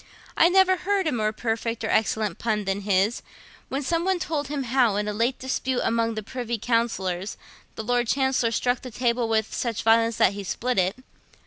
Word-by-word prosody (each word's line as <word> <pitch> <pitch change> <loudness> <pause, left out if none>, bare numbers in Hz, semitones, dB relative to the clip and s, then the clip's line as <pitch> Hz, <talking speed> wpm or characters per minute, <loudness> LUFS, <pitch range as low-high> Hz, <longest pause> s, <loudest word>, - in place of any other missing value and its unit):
I 335 - +5
never 375 0 +4
heard 385 +1 0
a 310 - +1
more 215 -3 0
perfect 230 0 -3
or 220 - -2
excellent 215 -3 0
pun 215 -3 -1
than 195 +1 -1
his, 200 +3 +1 0.5
when 275 +2 -2
some 335 +5 0
one 380 0 +1
told 310 -4 -2
him 285 -1 -3
how, 245 -4 +2
in 210 0 -1
a 210 - -2
late 235 +5 0
dispute 260 -1 -2
among 230 0 0
the 215 - -4
Privy 235 +1 -4
Councillors, 210 -5 -1 0.4
the 220 - -5
Lord 245 +1 +1
Chancellor 265 -2 +1
struck 245 +2 0
the 255 - -7
table 235 -1 0
with 220 -1 0
such 235 -3 -2
violence 225 0 +3
that 190 - +4
he 200 0 -6
split 245 +4 -1
it. 185 +3 +1
230 Hz, 200 wpm, -25 LUFS, 215-260 Hz, 0.5 s, I